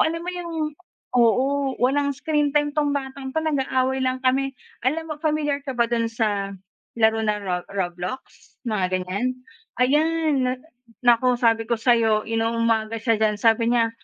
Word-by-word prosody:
alam 330 +1 -4
mo 360 - -2
yung 350 -1 -6 0.7
oo, 265 +4 +2
walang 280 +2 +1
screen 295 0 +1
time 295 0 +2
'tong 290 -1 +1
batang 265 -1 -5
'to, 320 - +1
nag-aaway 265 -3 0
lang 260 0 -1
kami. 270 +1 +1 0.3
Alam 320 +2 -3
mo - - -4
pamilyar 300 -2 0
ka 260 - -3
ba 235 - +4
dun 230 -1 +1
sa 205 -3 -1 0.4
laro 220 -1 +3
na 210 -1 0
ro 180 -2 -1 0.2
Roblox, 180 +5 -3 0.4
mga 215 -6 0 0.2
ganiyan? 200 +8 -2 0.5
Ayan 300 +6 +3 0.3
na 250 - +1 0.5
naku 245 +1 +4
sabi 225 -2 +2
ko 235 - +1
sa'yo 225 -2 +3
inu-umaga 225 -1 0
siya 230 -3 +2
diyan 215 -1 +2
sabi 225 0 +3
niya 230 -2 +2
250 Hz, 160 wpm, -23 LUFS, 225-280 Hz, 0.7 s, ba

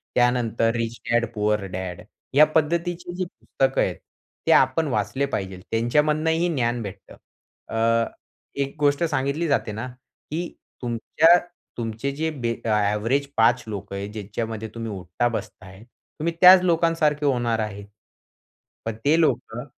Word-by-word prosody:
त्यानंतर 120 -2 +2
Rich 115 0 -2
Dad 120 0 +3
Poor 105 0 +2 0.2
Dad. 95 -2 -5 0.3
या 150 +3 +8
पद्धतीची 170 +3 0
जी 185 0 -2
पुस्तकं 135 -5 -1
आहेत, - - 0 0.5
ते - - +5
आपण 135 +4 +4
वाचले 135 +1 0
पाहिजे. 95 -2 -3
त्यांच्यामधूनही 150 +8 +2
ज्ञान 120 -3 0
भेटतं. 100 -2 -9 0.5
अ, 115 - -3 0.8
एक 140 0 -3
गोष्ट 145 +2 +2
सांगितली 145 +1 0
जाते 140 -6 0
ना, 110 +5 -5 0.4
की 170 +2 -2 0.3
तुमच्या 150 +8 +4 0.4
तुमचे 115 +3 -3
जे 160 +2 -1 0.4
एव्हरेज 105 +6 +1
5 120 +2 +4
लोकं 100 -2 -6
आहेत 100 +1 -4
ज्याच्यामध्ये 110 +1 -4
तुम्ही 115 -1 -4
उठता-बसताय 95 0 -4
तुम्ही 155 +7 -6
त्याच 185 0 +10
लोकांसारखे 165 -4 +2
होणार 120 -4 +1
आहे. 105 -2 -4 1.0
पण 115 - -3
ते 155 +3 +4
लोकं 120 -6 0
120 Hz, 125 wpm, -24 LUFS, 110-150 Hz, 1.0 s, त्याच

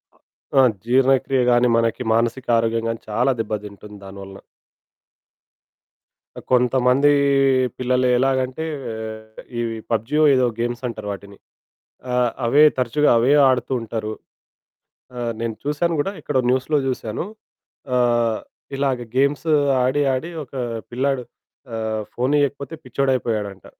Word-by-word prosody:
అ - - -28 0.4
ఆ! - - +8 0.2
జీర్ణక్రియ 130 +1 +3
గానీ, 120 0 +4
మనకి 115 +1 0
మానసిక 115 +3 0
ఆరోగ్యం 115 0 0
గానీ, 115 - -4
చాలా 120 +5 +2
దెబ్బదింటుంది 105 -1 -7
దాని 95 0 -10
వలన. 95 0 -11 2.0
ఆ! - - -7
కొంతమందీ 125 +3 +4 0.6
పిల్లలు 125 0 +1
ఎలాగంటే, 130 +3 0 0.3
ఆహ్, 110 0 -8 0.2
ఇవి 115 -1 -3
పబ్జీయో 115 +8 +1
ఏదో 130 -1 +3
గేమ్సంటరు 120 -2 -3
వాటిని. 100 0 -9 0.8
ఆ! - - 0 0.3
అవే 145 +6 +6
తరచుగా 130 +4 +2
అవే 125 +5 +3 0.2
ఆడుతూ 130 +1 0
ఉంటరు. 110 -1 -4 1.0
ఆ! - - -5 0.2
నేను 115 -1 -2
చూశాను 160 +3 0
గూడా 195 +7 -1
ఎక్కడో 130 - 0
న్యూస్‌లో 130 +4 +1
జూశాను. 125 +2 -3 0.7
ఆహ్, 120 -2 +2 0.4
ఇలాగ 135 -2 0 0.2
గేమ్స్ 140 +4 +1 0.4
ఆడి, 130 +3 +1
ఆడి 155 +7 -4
ఒకా 135 0 -7 0.3
పిల్లాడు 130 +1 -1 0.5
ఆహ్, 110 -1 -2
ఫోనియ్యకపోతే 140 +2 0
పిచ్చోడయిపోయాడంట. 120 -7 -2
125 Hz, 115 wpm, -21 LUFS, 115-135 Hz, 2.0 s, ఆ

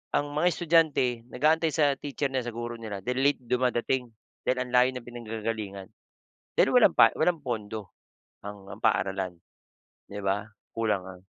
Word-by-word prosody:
ang 145 0 0
mga 155 +4 +2
estudyante 155 -9 +2
nag-aantay 155 +6 +2
sa 145 -3 +3
teacher 140 -1 -3
nila, 130 -2 -2
sa 115 - -5
guro 120 0 -4
nila 100 -4 -6
then 125 +1 -1
late 145 0 +3
dumadating 125 +1 0 0.4
dahil 125 0 +2
ang 125 - -10
layo 125 +1 +6
ng 125 - -6
pinanggagalingan 110 -4 -5 0.7
dahil - - +5
walang - - +6
pa - - +7
walang 165 -2 +2
pondo 110 -5 -4 0.5
ang 100 -1 -9
ang 105 - -10
paaralan. 95 -1 +1 0.7
'Di 105 +1 -6
ba? 100 +2 -1 0.3
Kulang 105 -5 0
ang 95 -1 -11
120 Hz, 160 wpm, -28 LUFS, 105-135 Hz, 0.7 s, pa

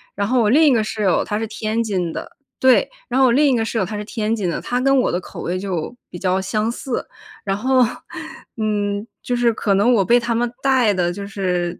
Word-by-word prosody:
然 200 - -1
后 250 +3 +2
我 215 - +3
另 295 +8 +5
一 280 - +5
个 230 - +3
室 215 0 -4
友， 190 -3 +2
她 210 - -2
是 225 - -2
天 220 +1 -2
津 185 -6 -2
的， - - -7 0.2
对， 260 -1 +4 0.2
然 - - -1
后 265 - +6
我 - - +3
另 280 +3 +4
一 - - +3
个 225 - +1
室 225 - -3
友， 205 - +1
她 210 - -6
是 210 - -4
天 220 0 -1
津 200 -5 -2
的， - - -2
她 245 - -1
跟 275 +1 +4
我 - - +1
的 175 - 0
口 - - -10
味 180 +2 -2
就 190 +2 -4
比 - - -8
较 190 0 +1
相 215 +3 -1
似。 245 +1 -4 0.4
然 195 -1 0
后， 255 +5 +2 0.8
嗯， 205 -1 -1 0.2
就 245 - -1
是 240 -1 +3
可 205 -2 0
能 215 +6 +4
我 210 -5 +3
被 240 +3 +5
她 235 0 -2
们 235 +1 0
带 260 -6 +3
的 175 -2 0
就 200 +2 -6
是， 180 -3 -2
215 Hz, 270 characters per minute, -20 LUFS, 195-240 Hz, 0.8 s, 后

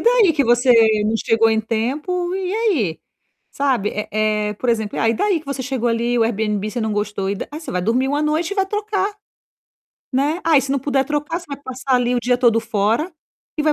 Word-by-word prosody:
daí 465 -7 +4
que 290 - +2
você 240 +1 +4 0.3
não 215 +1 0
chegou 225 0 +3
em 220 0 +2
tempo, 295 - -2
e 380 -1 -2
aí?". 335 - 0 0.5
Sabe. 260 -7 0
Eh, 210 - -4
eh, 210 0 0
por 245 +4 -4
exemplo: 220 -3 -2
"Ah, 225 - +2
e 225 - +2
daí 385 - +1
que 305 - -21
você 280 -1 -3
chegou 255 -2 -1
ali, 235 +1 0
o - - +4
Airbnb 215 -2 -1
você 245 - -4
não 220 -1 -1
gostou 205 -2 -2
e - - -1
da - - -5
é 305 - -6
você 325 - -7
vai 180 - -1
dormir 245 +7 +1
uma 290 +2 0
noite 315 +5 0
e - - -3
vai 385 -1 +2
trocar". 415 -1 -1 1.0
Né. 290 +6 0
"Ah, 320 -3 +5
e - - +1
se 275 - -2
não 280 - +1
puder 270 0 +1
trocar 295 +4 -2
você 350 - -15
vai 280 - -5
passar 260 0 -2
ali 245 0 +1
o - - 0
dia 245 +1 +2
todo 235 -3 +4
fora 225 - 0 0.5
e - - +2
vai 305 0 +3
255 Hz, 235 wpm, -20 LUFS, 220-310 Hz, 1.0 s, Ah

